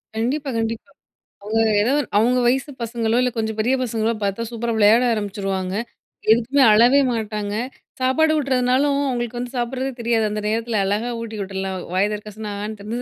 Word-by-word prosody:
கண்டிப்பா, 270 +6 -1
கண்டிப்பா. 225 +4 -3 0.5
அவுங்க 225 +2 0 0.2
எதோ 250 +6 +2 0.2
அவுங்க 245 +4 +3
வயசு 265 +3 +1
பசங்களோ 230 0 -1
இல்ல, 250 - +2
கொஞ்சம் 220 0 -2
பெரிய 245 +5 +2
பசங்களோ, 225 -1 0
பார்த்தா 200 +3 -1
சூப்பரா 235 0 -2
விளையாட 220 +3 +5
ஆரம்பிச்சுருவாங்க. 195 -3 -3 0.6
எதுக்குமே 245 +5 +3
அழவே 245 +6 +6
மாட்டாங்க. 210 -2 -3 0.5
சாப்பாடு 310 +5 +3
ஊட்றதுனாலும், 270 +1 +2
அவுங்களுக்கு 240 -1 -3
வந்து 245 +1 -5
சாப்ட்றதே 255 +2 -2
தெரியாது. 230 -1 +1
அந்த 210 0 -3
நேரத்துல 225 0 -1
அழகா 210 +5 -1
ஊட்டி 220 -2 -6
விட்ருலாம். 190 -1 -4 0.2
வாய 190 +2 +3
தெறக்க 210 0 -7
சொன்னா, 215 -1 -5
ஆன்னு 215 +2 -5
230 Hz, 150 wpm, -21 LUFS, 210-250 Hz, 0.6 s, அழவே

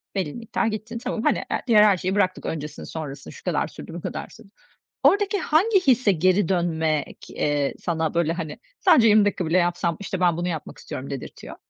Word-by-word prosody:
belli 185 -7 -2
miktar 230 -2 -2
gittin. 220 +2 -4
Tamam, 230 -1 -4
hani, - - +1 0.2
diğer 215 -3 +6
her 200 -3 +5
şeyi 185 +3 -2
bıraktık, 185 -2 0
öncesini 150 -1 -5
sonrasını, 145 -3 -7
şu - - -14
kadar - - 0
sürdü, - - -10
bu - - -6
kadar - - -5
sürdü. - - -16 0.5
Oradaki 405 0 +3
hangi 380 +6 +3
hisse 250 -5 +4
geri 185 +2 +2
dönmek, 160 -4 -1
eee, 145 -2 0
sana 160 -2 -1
böyle, 165 -1 +1
hani, 165 -3 -5 0.2
sadece 320 - +5
20 210 -1 +6
dakika 200 -3 0
bile 165 +3 +2
yapsam 175 -2 0
işte 190 -2 -4
ben 175 -2 +2
bunu 175 +1 -2
yapmak 160 -4 -5
istiyorum 130 - -7
dedirtiyor? 135 -2 -8
180 Hz, 190 wpm, -24 LUFS, 160-215 Hz, 0.5 s, diğer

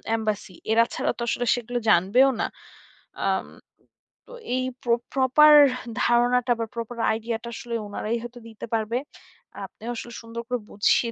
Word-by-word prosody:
Embassy 215 -3 -3 0.2
এরা 230 +1 +5
ছাড়া - - 0
তো - - -7
আসলে 245 - -1
সেগুলো 245 0 -4
জানবেও 215 +9 +5
না। - - +1 0.8
আম - - 0 0.8
তো - - -13 0.2
এই 255 - 0 0.2
প্র 240 - 0 0.2
প্রপার 275 +3 +6 0.5
ধারণাটা 245 +1 +3
বা 230 - -1
প্রপার 235 +1 -5
আইডিয়া 225 +1 -2
টা 235 - -6
আসলে 240 -3 -5
উনারাই 215 +3 -3
হয়তো 240 0 -9
দিতে 220 - -8
পারবে। 225 +1 0 0.7
আপনিও 230 +2 -10
আসলে 235 +1 -7
সুন্দর 230 0 -7
করে 250 0 -1
বুঝিয়ে 230 +3 +2
235 Hz, 150 wpm, -25 LUFS, 225-245 Hz, 0.8 s, প্রপার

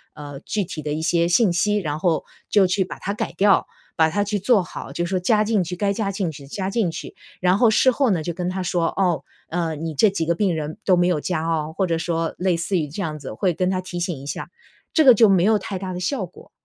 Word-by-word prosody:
呃， 145 -2 -8
具 210 +4 -2
体 160 -3 -6
的 150 0 -2
一 155 - -3
些 170 +1 +2
信 185 +2 +4
息， 210 +4 +2
然 150 -7 -2
后 170 -2 +1 0.3
就 195 -3 +4
去 190 +2 +1
把 - - -9
它 200 - -3
改 - - -3
掉， 200 0 +4 0.3
把 160 - +5
它 205 +5 0
去 205 0 -1
做 210 +1 +3
好， - - -8
就 175 - -2
说 185 +1 -1
加 210 +4 +3
进 215 -3 +1
去， 180 +1 -5
该 200 +2 0
加 200 -2 -2
进 190 -4 -2
去 140 -1 -11
加 190 +6 -3
进 195 -4 0
去。 - - -8 0.3
然 180 +1 +3
后 235 +1 +5
事 260 - +4
后 255 -1 +1
呢 175 -4 +1
就 170 - -3
跟 175 +1 -3
他 190 +1 -3
说： 175 -1 0
“哦， 180 -4 +1 0.3
呃， 165 -2 -1
你 160 0 -5
这 215 +7 +5
几 175 -4 -2
个 170 - +2
病 190 -2 +1
人 155 +1 -4
都 185 - +5
没 175 0 +3
有 175 -4 +1
加 160 -2 -2
哦。” 160 -1 -1
或 190 -2 +1
者 165 - 0
说 165 -1 -2
类 180 -1 +1
似 175 +3 -1
于 155 -3 -1
这 170 +8 -5
样 155 -3 -3
子， 135 - -7
会 180 - +1
跟 180 +3 0
他 185 -1 -1
提 180 -1 -6
醒 175 -1 -2
一 - - -10
下。 - - -4 0.5
这 315 - +4
个 255 - +10
就 220 -1 +6
没 185 -2 +4
有 220 0 +4
太 190 -2 -5
大 185 -1 -5
的 180 - -4
效 280 - -1
果， - - -17
180 Hz, 290 characters per minute, -22 LUFS, 165-200 Hz, 0.5 s, 个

